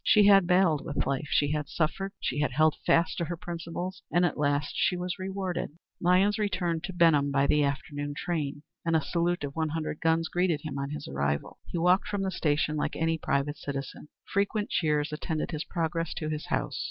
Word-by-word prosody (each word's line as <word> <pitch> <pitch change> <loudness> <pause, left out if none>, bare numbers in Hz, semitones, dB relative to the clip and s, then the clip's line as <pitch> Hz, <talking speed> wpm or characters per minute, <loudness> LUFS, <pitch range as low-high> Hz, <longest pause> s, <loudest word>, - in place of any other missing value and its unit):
She 210 -2 +6
had 195 -3 +7
battled 180 -5 +3
with 145 - -2
life, 140 +2 -1
she 145 -3 +2
had 150 -2 -2
suffered, 195 +5 -1
she 140 - -2
had 145 -3 0
held 155 +2 +4
fast 165 +2 +3
to 170 - 0
her 175 +1 -4
principles, 175 +2 -5
and 175 +1 +4
at 175 - 0
last 145 -1 0
she 180 - +2
was 180 +2 -3
rewarded. 185 -4 -3 0.2
Lyons 185 +4 +3
returned 175 -5 -1
to 190 - -6
Benham 165 -5 +4
by 140 0 +2
the 150 +1 +3
afternoon 145 +1 -3
train, 150 -4 -2 0.2
and 165 -1 +1
a 160 - +4
salute 175 0 0
of 140 -1 -4
one 160 -1 0
hundred 155 -1 -3
guns 165 0 +2
greeted 175 -4 +1
him 145 -3 -5
on 140 0 -3
his 150 - -6
arrival. 70 +1 -2
He - - -4
walked 180 +3 +3
from 205 -2 -2
the 190 - -1
station 155 -2 0
like - - -1
any 165 0 0
private 145 +1 0
citizen. 135 0 -6 0.2
Frequent 205 +1 -1
cheers 150 -2 +1
attended 155 +1 -3
his 155 0 -3
progress 165 -1 -2
to 155 -2 -3
his 155 0 -4
house. - - -1
160 Hz, 205 wpm, -28 LUFS, 145-180 Hz, 0.2 s, had